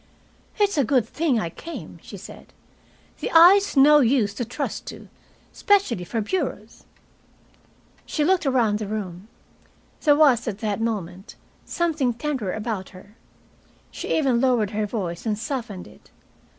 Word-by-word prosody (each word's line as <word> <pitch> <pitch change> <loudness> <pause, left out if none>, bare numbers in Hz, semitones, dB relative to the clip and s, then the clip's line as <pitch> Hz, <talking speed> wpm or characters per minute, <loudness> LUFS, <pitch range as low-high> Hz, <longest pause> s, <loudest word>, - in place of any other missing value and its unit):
"It's 405 -6 +1
a - - +4
good 250 -1 +1
thing 300 -7 0
I 170 -5 -3
came," 335 - -9
she - - -10
said. - - -13 0.7
"The - - -3
eye's 360 +1 +6
no 295 +2 +7
use 235 -6 +2
to 225 - -3
trust 245 +5 -5
to, - - -9 0.4
especially 380 - +1
for 225 +5 -2
bureaus." 360 - -4 1.2
She 300 - -1
looked 365 -3 +2
around 230 -6 +2
the 215 - -4
room. 195 -2 -6 0.7
There 295 -1 +4
was, 275 -6 +4
at 205 -4 -3
that 215 -1 -3
moment, 195 -4 -4 0.3
something 310 -8 0
tender 250 -7 -3
about 215 -3 -4
her. 200 +3 -16 0.8
She - - -2
even 265 -6 +2
lowered 240 -6 +2
her 215 0 -2
voice 190 -2 -4
and 210 -1 0
softened 230 -6 -5
it. - - -19
235 Hz, 145 wpm, -23 LUFS, 210-295 Hz, 1.2 s, no